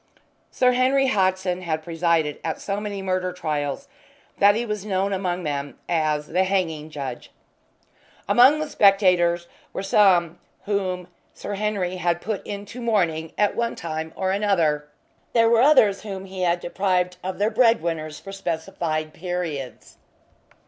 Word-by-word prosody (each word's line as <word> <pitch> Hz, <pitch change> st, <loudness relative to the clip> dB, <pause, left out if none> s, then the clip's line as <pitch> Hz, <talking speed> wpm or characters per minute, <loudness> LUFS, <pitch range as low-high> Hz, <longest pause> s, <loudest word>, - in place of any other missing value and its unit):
Sir 250 Hz, -1 st, +3 dB
Henry 260 Hz, +2 st, +3 dB
Hodson 185 Hz, -3 st, +1 dB
had 160 Hz, -3 st, -3 dB
presided 165 Hz, -2 st, 0 dB
at 160 Hz, -, -3 dB
so 200 Hz, 0 st, -3 dB
many 205 Hz, -2 st, -5 dB
murder 185 Hz, -1 st, -1 dB
trials 155 Hz, -, -3 dB, 0.5 s
that 205 Hz, +1 st, +6 dB
he 235 Hz, +2 st, -1 dB
was 210 Hz, -3 st, -4 dB
known 195 Hz, -1 st, -1 dB
among 180 Hz, -2 st, -2 dB
them 145 Hz, -2 st, -4 dB
as 155 Hz, -3 st, 0 dB
"the 185 Hz, +3 st, +2 dB
Hanging 170 Hz, -5 st, -1 dB
Judge." 140 Hz, -5 st, -6 dB, 1.0 s
Among 250 Hz, +8 st, +6 dB
the 310 Hz, -, -2 dB
spectators 180 Hz, -7 st, +3 dB, 0.3 s
were -, -, -4 dB
some 180 Hz, -4 st, +3 dB, 0.3 s
whom 185 Hz, -3 st, -2 dB, 0.3 s
Sir 205 Hz, -, -6 dB
Henry 200 Hz, -3 st, -2 dB
had 175 Hz, -1 st, 0 dB
put 205 Hz, +2 st, -4 dB
into 205 Hz, +4 st, -7 dB
mourning 170 Hz, -8 st, 0 dB
at 210 Hz, -1 st, +2 dB
one 235 Hz, 0 st, -1 dB
time 160 Hz, -1 st, -5 dB
or 190 Hz, -1 st, -1 dB
another; 170 Hz, -8 st, +1 dB, 0.5 s
there 230 Hz, -1 st, +4 dB
were 230 Hz, 0 st, +5 dB
others 245 Hz, -8 st, +5 dB
whom 195 Hz, -3 st, -6 dB
he 190 Hz, -1 st, -7 dB
had 175 Hz, -1 st, +1 dB
deprived 180 Hz, 0 st, 0 dB
of 185 Hz, 0 st, -4 dB
their 210 Hz, +2 st, +1 dB
bread 230 Hz, -2 st, +4 dB
winners 155 Hz, -3 st, -3 dB
for 195 Hz, -, -10 dB
specified 160 Hz, -4 st, -3 dB
periods. 170 Hz, -7 st, -5 dB
185 Hz, 150 wpm, -23 LUFS, 165-205 Hz, 1.0 s, that